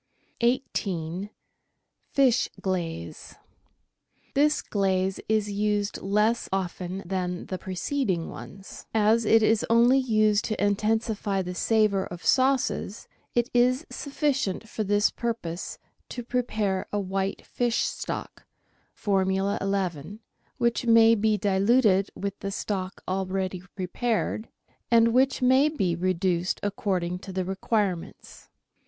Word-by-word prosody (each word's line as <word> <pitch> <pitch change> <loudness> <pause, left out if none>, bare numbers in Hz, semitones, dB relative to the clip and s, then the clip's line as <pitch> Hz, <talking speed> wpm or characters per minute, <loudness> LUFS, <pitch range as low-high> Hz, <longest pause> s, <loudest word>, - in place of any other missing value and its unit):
18— 195 -7 -1 0.8
FISH 260 -4 +3
QLAZE 170 - -4 1.0
This 300 +2 +3
glaze 190 -2 0
is 215 -1 +1
used 205 0 -1
less 210 +4 +1
often 185 0 -3
than 180 -1 -3
the 185 - -5
preceding 190 - -2
ones. 195 0 -10
As 220 +1 +3
it 225 +1 +5
is 220 0 +3
only 240 +3 +5
used 215 -4 +2
to 215 - -3
intensify 210 -1 0
the 180 0 -5
savour 210 -1 +2
of 175 0 -9
sauces, 260 -5 +1 0.3
it 240 +1 +1
is 250 +5 +3
sufficient 275 - -1
for 220 - -3
this 205 +1 +2
purpose 215 -7 -4 0.3
to 245 - -6
prepare 215 -6 -1
a 205 - 0
white 195 0 -2
fish 240 -2 0
stock - - -5 0.5
(Formula 195 -1 0
11), 195 -1 -2 0.4
which 235 +1 0
may 230 0 +7
be 215 -1 +2
diluted 200 +1 +3
with 200 0 -4
the 200 - -4
stock 195 -1 -4
already 185 -1 -2
prepared, 215 +3 -2 0.4
and 230 -1 +5
which 265 +1 +2
may 260 +4 +5
be 190 - 0
reduced 180 0 0
according 185 -3 -1
to 195 - -9
the 185 -1 -2
requirements. 190 -1 -3
205 Hz, 115 wpm, -26 LUFS, 190-230 Hz, 1.0 s, may